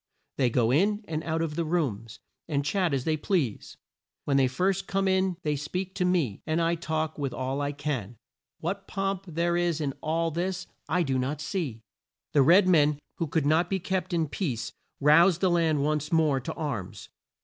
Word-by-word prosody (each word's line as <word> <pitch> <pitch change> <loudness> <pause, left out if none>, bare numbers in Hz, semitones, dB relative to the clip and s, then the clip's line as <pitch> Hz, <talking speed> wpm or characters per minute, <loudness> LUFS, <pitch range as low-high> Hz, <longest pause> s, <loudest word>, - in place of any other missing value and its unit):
They 130 -3 +3
go 115 0 +2
in 205 - +2
and 155 -1 -3
out 165 0 -1
of 160 -2 -3
the 170 - 0
rooms 135 - -2 0.3
and 140 -3 -1
chat 180 +2 +1
as 135 -2 0
they 160 +2 +1
please. 145 - -1 0.5
When 140 - +1
they 135 -1 +4
first 185 +9 0
come 195 0 0
in 190 -1 +1
they 150 -1 0
speak 180 +6 -4
to 185 -2 0
me, 165 - 0
and 160 +1 +1
I 165 0 +2
talk 160 -2 -2
with 135 -3 -2
all 130 +2 -2
I 145 0 -1
can. 140 -7 -4 0.4
What 195 +4 -3
pomp 195 -1 -2
there 170 +1 0
is 175 -2 +1
in 140 -3 -1
all 165 +1 0
this 180 +3 -2 0.2
I 180 -1 +2
do 135 -4 0
not 135 +4 -2
see!" 145 - -3 0.5
The 145 - +5
red 180 +8 +6
men, 150 -4 +4 0.2
who 165 - 0
could 150 0 0
not 160 +4 +3
be 195 - +1
kept 190 +1 -2
in 165 -2 +1
peace, 140 - -3 0.3
roused 165 +5 +5
the 185 -2 +2
land 160 -4 +2
once 150 +1 -1
more 155 -5 +3
to 125 - -5
arms. 130 - -5
160 Hz, 195 wpm, -27 LUFS, 140-180 Hz, 0.5 s, red